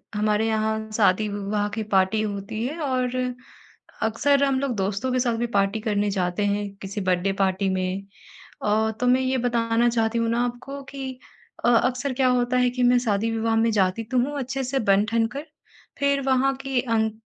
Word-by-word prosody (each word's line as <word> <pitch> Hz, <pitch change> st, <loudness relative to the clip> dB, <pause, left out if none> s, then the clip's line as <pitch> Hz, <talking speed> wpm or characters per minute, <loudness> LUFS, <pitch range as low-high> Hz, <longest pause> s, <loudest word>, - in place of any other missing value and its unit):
हमारे 210 Hz, +1 st, +1 dB
यहाँ 220 Hz, 0 st, -1 dB
शादी-विवाह 205 Hz, 0 st, +1 dB
की 220 Hz, -, -2 dB
पार्टी 190 Hz, +3 st, +3 dB
होती 205 Hz, +1 st, -4 dB
है 300 Hz, +5 st, -5 dB
और 255 Hz, -3 st, -1 dB, 0.9 s
अक्सर 275 Hz, +6 st, +2 dB
हम 270 Hz, -1 st, +2 dB
लोग 270 Hz, -3 st, -1 dB
दोस्तों 205 Hz, +6 st, -1 dB
के 255 Hz, -, +2 dB
साथ 240 Hz, -2 st, +1 dB
भी 240 Hz, +1 st, -1 dB
पार्टी 200 Hz, +2 st, +2 dB
करने 210 Hz, -2 st, 0 dB
जाते 185 Hz, +1 st, -1 dB
हैं 205 Hz, 0 st, -1 dB
किसी 195 Hz, +2 st, -5 dB
बर्थडे 185 Hz, +1 st, +1 dB
पार्टी 190 Hz, 0 st, +1 dB
में 190 Hz, +1 st, -2 dB, 0.6 s
और 220 Hz, +1 st, +2 dB
तो 250 Hz, -, +2 dB
मैं 255 Hz, +1 st, +4 dB
ये 260 Hz, 0 st, 0 dB
बताना 235 Hz, -1 st, +1 dB
चाहती 230 Hz, -1 st, 0 dB
हूँ 230 Hz, 0 st, 0 dB
ना 235 Hz, +1 st, +1 dB
आपको 245 Hz, +3 st, -6 dB
कि, 265 Hz, -2 st, -7 dB, 0.5 s
अ, -, -, +5 dB
अक्सर 250 Hz, +3 st, +2 dB
क्या 255 Hz, 0 st, +2 dB
होता 250 Hz, 0 st, +1 dB
है 250 Hz, 0 st, +3 dB
कि 250 Hz, 0 st, -1 dB
मैं 245 Hz, 0 st, +5 dB
शादी-विवाह 225 Hz, 0 st, 0 dB
में 225 Hz, +1 st, +3 dB
जाती 195 Hz, +1 st, +1 dB
तो 250 Hz, +3 st, 0 dB
हूँ 285 Hz, +4 st, -1 dB
अच्छे 270 Hz, +1 st, -3 dB
से 265 Hz, +1 st, -1 dB
बन-ठन 220 Hz, +3 st, +2 dB
कर 285 Hz, +2 st, -5 dB, 0.5 s
फ़िर 280 Hz, 0 st, +2 dB
वहाँ 270 Hz, +1 st, +2 dB
की 265 Hz, -2 st, 0 dB
आन 225 Hz, -3 st, 0 dB
230 Hz, 185 wpm, -24 LUFS, 205-255 Hz, 0.9 s, अ